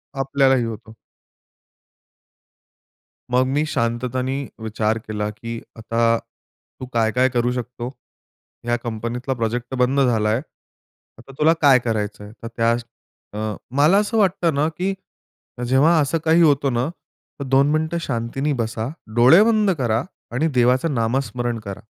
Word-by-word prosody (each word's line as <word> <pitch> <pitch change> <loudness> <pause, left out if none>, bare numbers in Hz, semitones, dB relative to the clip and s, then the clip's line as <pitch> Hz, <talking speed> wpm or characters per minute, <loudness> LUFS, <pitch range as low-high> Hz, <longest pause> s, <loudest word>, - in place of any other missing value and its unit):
आपल्यालाही 135 -1 +2
होतो. 110 0 -8 2.4
मग 130 +1 +3
मी 150 +2 +1
शांततेने 130 +1 -2 0.2
विचार 110 0 -1
केला 105 -1 -2
की 115 +2 -7 0.2
"आता 115 +1 +1 0.6
तू 130 - -5
काय-काय 115 +3 +2
करू 120 0 0
शकतो? 125 0 -5 0.8
या 120 - +2
कंपनीतला 120 +3 -3
प्रोजेक्ट 120 0 -2
तर - - -2
बंद 130 +2 +2
झाला 110 -4 +2
आहे. 110 - +2 0.8
आता 120 +4 -14
तुला 160 +2 +5
काय 135 -3 +6
करायचं 105 -3 -3
आहे?" 105 - -10
तर - - -4
त्या 115 0 +2 0.6
अ, 110 0 -3 0.2
मला 150 +7 +5
असं 210 +2 +1
वाटतं 180 -5 +2
ना 150 +2 +2
की 190 +2 0 0.7
जेव्हा 145 +6 +4
असं 145 +4 0
काही 165 +2 +5
होतं 140 -4 +3
ना, 120 +4 0 0.5
तर - - -3
2 135 +2 +4
मिनिटं 160 +2 0
शांतीने 135 +2 -2
बसा, 110 0 -3 0.3
डोळे 130 +11 +7
बंद 215 -3 +3
करा 120 -2 0 0.3
आणि 155 +7 +1
देवाचं 125 +5 +2
नामस्मरण 120 0 -1
करा. 100 0 -8
125 Hz, 135 wpm, -21 LUFS, 115-140 Hz, 2.4 s, डोळे